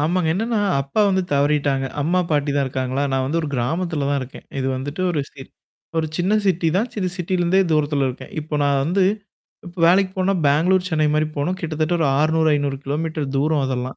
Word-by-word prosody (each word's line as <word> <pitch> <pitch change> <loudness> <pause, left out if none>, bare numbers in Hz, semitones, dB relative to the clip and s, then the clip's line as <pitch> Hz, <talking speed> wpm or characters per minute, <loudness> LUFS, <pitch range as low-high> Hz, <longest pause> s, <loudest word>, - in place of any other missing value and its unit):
ஆமாங்க, 165 +2 +1
என்னான்னா, 225 +5 -1 0.2
அப்பா 140 +10 -1
வந்து 190 -1 +1
தவறிட்டாங்க. 140 -1 +1 0.2
அம்மா 175 +5 +2
பாட்டி 145 -1 +1
தான் 140 - +2
இருக்காங்களா? 130 +1 -2
நான் 130 0 +1
வந்து 155 +5 0
ஒரு 155 - -3
கிராமத்தில 150 +4 -1
தான் 140 -1 +1
இருக்கேன். 130 0 -9
இது 130 - -1
வந்துட்டு 145 +6 -5
ஒரு 155 - 0
சிரி 135 -2 -10 0.5
ஒரு 160 - 0
சின்ன 185 +4 +1
சிட்டி 180 -4 +2
தான், 205 +6 +2
சின்ன 200 -4 -2
சிட்டிலருந்தே 180 0 +1
தூரத்தில 145 -3 +1
இருக்கேன், 130 - -8
இப்ப 150 0 -4
நான் 140 -1 +2
வந்து 180 +6 +1 0.6
இப்ப 175 +1 -11
வேலைக்கு 185 +2 +4
போனா, 185 +1 +2
பேங்ளூர், 180 +6 +3
சென்னை 155 -3 +1
மாரி 155 0 +2
போனும், 160 +6 -1
கிட்டத்தட்ட 160 -1 -2
ஒரு 160 -3 +1
600 160 +1 +2
500 145 -1 -1
கிலோமீட்டர் 155 +1 -2
தூரம் 150 +2 +1
அதெல்லாம். 130 0 -3
155 Hz, 190 wpm, -21 LUFS, 140-175 Hz, 0.6 s, வேலைக்கு